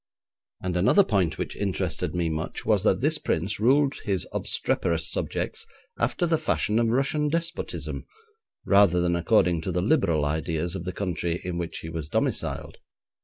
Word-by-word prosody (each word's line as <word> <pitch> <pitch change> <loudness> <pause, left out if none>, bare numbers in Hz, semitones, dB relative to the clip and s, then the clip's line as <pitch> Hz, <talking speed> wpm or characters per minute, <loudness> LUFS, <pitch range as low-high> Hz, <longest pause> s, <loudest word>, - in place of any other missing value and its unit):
And 90 -1 -2
another 100 - +5
point 95 - +1
which - - -4
interested 90 -4 -2
me 85 -1 0
much 80 0 -4
was - - +3
that - - +2
this - - +1
prince - - -1
ruled 135 +5 +4
his 95 -7 0
obstreperous 85 -1 0
subjects - - -2 0.3
after 175 - +1
the 165 -2 +2
fashion 115 -7 +1
of 115 - +2
Russian 140 +5 +1
despotism, 170 +2 -3 0.6
rather 100 -3 +5
than 85 0 +1
according 85 -1 +3
to 95 - -3
the 90 0 0
liberal 85 - +2
ideas 80 +2 -1
of 90 - -5
the 90 - -2
country 90 -2 -2
in 90 -1 -3
which 85 -1 -4
he 80 - -7
was 80 -2 -5
domiciled. - - -2
90 Hz, 165 wpm, -26 LUFS, 85-115 Hz, 0.6 s, another